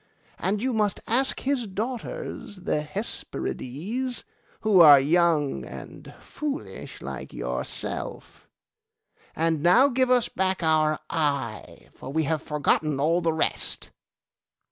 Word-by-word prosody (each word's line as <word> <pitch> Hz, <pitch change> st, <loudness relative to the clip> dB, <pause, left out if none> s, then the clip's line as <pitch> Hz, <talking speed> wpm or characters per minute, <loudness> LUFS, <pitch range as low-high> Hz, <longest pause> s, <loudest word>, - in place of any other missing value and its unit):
And 200 Hz, +5 st, -1 dB
you 260 Hz, -1 st, 0 dB
must 210 Hz, -3 st, +1 dB
ask 260 Hz, +4 st, +2 dB
his 260 Hz, -4 st, -1 dB
daughters, 215 Hz, 0 st, -5 dB
the 180 Hz, -5 st, -1 dB
Hesperides, 200 Hz, -, -4 dB, 0.4 s
who 210 Hz, -4 st, +4 dB
are 145 Hz, -4 st, +10 dB
young 155 Hz, -1 st, +2 dB
and -, -, -10 dB
foolish 300 Hz, 0 st, -6 dB
like -, -, -7 dB
yourself. -, -, -4 dB, 0.9 s
And 160 Hz, -2 st, +1 dB
now 185 Hz, -, +6 dB
give 255 Hz, 0 st, +1 dB
us 250 Hz, -2 st, +4 dB
back 185 Hz, -1 st, -1 dB
our 155 Hz, -1 st, +3 dB
eye, 140 Hz, -8 st, -2 dB
for 130 Hz, -, -9 dB
we 160 Hz, +2 st, +1 dB
have 155 Hz, +1 st, -1 dB
forgotten 150 Hz, -1 st, 0 dB
all 165 Hz, +5 st, +2 dB
the 165 Hz, -1 st, +1 dB
rest. 160 Hz, -, 0 dB
175 Hz, 120 wpm, -26 LUFS, 155-230 Hz, 0.9 s, are